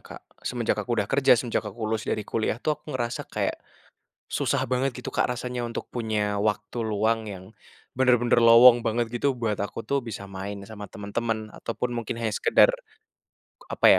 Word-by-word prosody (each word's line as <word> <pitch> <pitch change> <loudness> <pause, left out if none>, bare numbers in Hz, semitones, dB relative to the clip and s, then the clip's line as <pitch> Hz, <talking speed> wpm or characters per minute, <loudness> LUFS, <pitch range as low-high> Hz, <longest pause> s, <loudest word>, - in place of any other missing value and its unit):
Kak. - - -11 0.2
Semenjak 120 -4 -1
aku 120 0 -2
udah 105 - +1
kerja, 135 0 +4
semenjak 115 -3 -1
aku 105 0 -8
lulus 110 0 -1
dari 105 - -2
kuliah 110 0 -1
tuh 150 +4 0
aku 150 +1 -12
ngerasa 120 -1 -2
kayak - - -1 0.8
susah - - 0
banget 130 0 0
gitu, 125 - -6
Kak, - - +1
rasanya 125 0 -3
untuk 115 - -6
punya 105 -3 -1
waktu 105 +2 -1
luang 110 +1 0
yang 95 -3 -7 0.5
bener-bener 125 -2 +4
lowong 120 +1 +8
banget 115 +1 0
gitu 130 +3 0
buat 115 -4 -2
aku 105 +3 -4
tuh 140 +6 0
bisa 110 -6 -7
main 100 +1 -6
sama 105 0 -9
temen-temen 110 +2 -3
ataupun 120 +3 -4
mungkin 120 -1 -3
hanya 110 - 0
sekedar 105 - +4 1.0
apa - - 0
115 Hz, 170 wpm, -26 LUFS, 105-120 Hz, 1.0 s, lowong